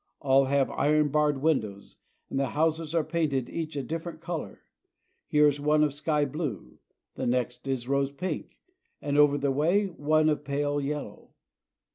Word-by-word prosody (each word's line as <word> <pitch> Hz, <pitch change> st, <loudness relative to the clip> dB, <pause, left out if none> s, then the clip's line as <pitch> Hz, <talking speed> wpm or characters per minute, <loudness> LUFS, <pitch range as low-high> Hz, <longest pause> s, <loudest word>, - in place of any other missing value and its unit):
All 135 Hz, -1 st, +4 dB
have 135 Hz, 0 st, +1 dB
iron 150 Hz, +1 st, +2 dB
barred 150 Hz, -1 st, +1 dB
windows, 105 Hz, -11 st, -1 dB, 0.3 s
and 135 Hz, -, -1 dB
the 135 Hz, -, +1 dB
houses 160 Hz, 0 st, 0 dB
are 165 Hz, -, +3 dB
painted 150 Hz, -6 st, -1 dB
each 160 Hz, -2 st, -4 dB
a 140 Hz, -, -2 dB
differ 165 Hz, +3 st, -4 dB
ent 165 Hz, -, -11 dB
color. 165 Hz, -, -6 dB, 0.7 s
Here 150 Hz, 0 st, +4 dB
is 145 Hz, 0 st, 0 dB
one 150 Hz, +1 st, +3 dB
of 150 Hz, -2 st, +1 dB
sky 150 Hz, 0 st, 0 dB
blue, 135 Hz, -, -5 dB, 0.3 s
the -, -, -3 dB
next 125 Hz, +1 st, -1 dB
is 130 Hz, -3 st, -2 dB
rose 140 Hz, 0 st, +1 dB
pink, 175 Hz, +7 st, -5 dB, 0.4 s
and 145 Hz, -1 st, -2 dB
over 145 Hz, -1 st, +5 dB
the 140 Hz, -1 st, 0 dB
way 160 Hz, +9 st, +2 dB
is 195 Hz, -, -4 dB
one 155 Hz, 0 st, +2 dB
of 150 Hz, -2 st, +1 dB
pale 145 Hz, 0 st, -1 dB
yellow. 145 Hz, +1 st, -6 dB
145 Hz, 175 wpm, -28 LUFS, 135-155 Hz, 0.7 s, over